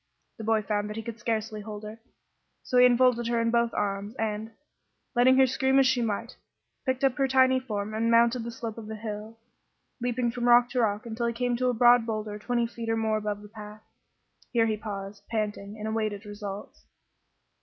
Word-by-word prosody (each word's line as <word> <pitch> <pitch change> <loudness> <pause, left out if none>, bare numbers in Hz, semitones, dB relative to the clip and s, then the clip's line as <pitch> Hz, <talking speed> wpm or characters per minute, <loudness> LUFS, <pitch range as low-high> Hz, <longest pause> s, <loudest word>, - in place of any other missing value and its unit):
The 225 - -7
boy 220 0 +2
found 205 0 -1
that 210 - -6
he 225 - -5
could 235 0 -7
scarcely 220 -2 -2
hold 210 0 -8
her, 215 +2 -8 0.6
so 250 - +2
he 250 - +9
enfolded 245 -1 +3
her 235 0 +1
in 230 0 +1
both 235 0 +2
his - - -12
arms 205 +2 -2
and, 220 -1 -3 0.6
letting 260 +1 +5
her 265 - +7
scream 265 +1 +1
as 270 - +6
she 255 -1 +2
might, 230 +2 -3 0.5
picked 260 +1 0
up 270 -2 +4
her 270 - +3
tiny 260 0 +4
form 215 -4 -4
and 225 +1 0
mounted 235 +1 +4
the 235 - -5
slope 230 -1 -6
of 215 - -9
the 220 - -5
hill, 215 +1 -7 0.6
leaping 245 -1 0
from 245 0 -1
rock 240 0 +6
to 255 - 0
rock 210 -2 0
until 235 +1 -2
he 235 - -1
came 245 +1 0
to 255 +1 +1
a 245 - 0
broad 240 0 +5
boulder 215 -1 -3
twenty 240 +2 0
feet 230 0 -6
or 225 - +1
more 220 -1 +1
above 210 -1 -4
the - - -10
path. 210 0 -11 0.7
Here 230 -2 +3
he 220 -1 0
paused, 200 -1 -7
panting, 210 -2 -3
and 215 0 -5
awaited 215 -2 -2
results. 205 -1 -8
225 Hz, 210 wpm, -27 LUFS, 210-240 Hz, 0.7 s, he